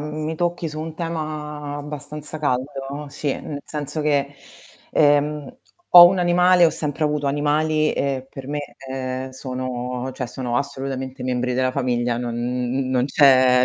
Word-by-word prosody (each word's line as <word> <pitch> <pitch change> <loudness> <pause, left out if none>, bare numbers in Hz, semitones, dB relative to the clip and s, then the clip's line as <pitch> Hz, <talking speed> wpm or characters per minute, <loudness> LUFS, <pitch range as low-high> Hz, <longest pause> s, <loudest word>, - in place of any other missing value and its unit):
mi 155 +1 -4
tocchi 175 0 -1
su 155 0 -5
un 160 0 -6
tema 150 -3 -4
abbastanza 150 +1 -7
caldo, 140 +1 -3
sì, 145 0 -3
nel 145 -1 -6
senso 150 0 -5
che, 145 -2 0 0.6
ehm, 150 - +2 0.3
ho 175 -1 +12
un 190 +1 +2
animale, 180 0 +5
ho 165 - +5
sempre 150 0 -2
avuto 150 -1 0
animali 150 +2 +1
e 135 -2 -2
per 135 -1 -9
me 145 0 -2 0.3
ehm, 130 0 -4
sono 125 -1 -4
cioè 125 -1 -4
sono 125 -1 -3
assolutamente 135 -1 -4
membri 125 0 -1
della 130 +1 +1
famiglia, 125 -2 0
non 120 -1 -3
n 125 +2 -1
n - - -3
non 125 -1 +2
c'è 130 -2 +5
140 Hz, 155 wpm, -22 LUFS, 130-150 Hz, 0.6 s, ho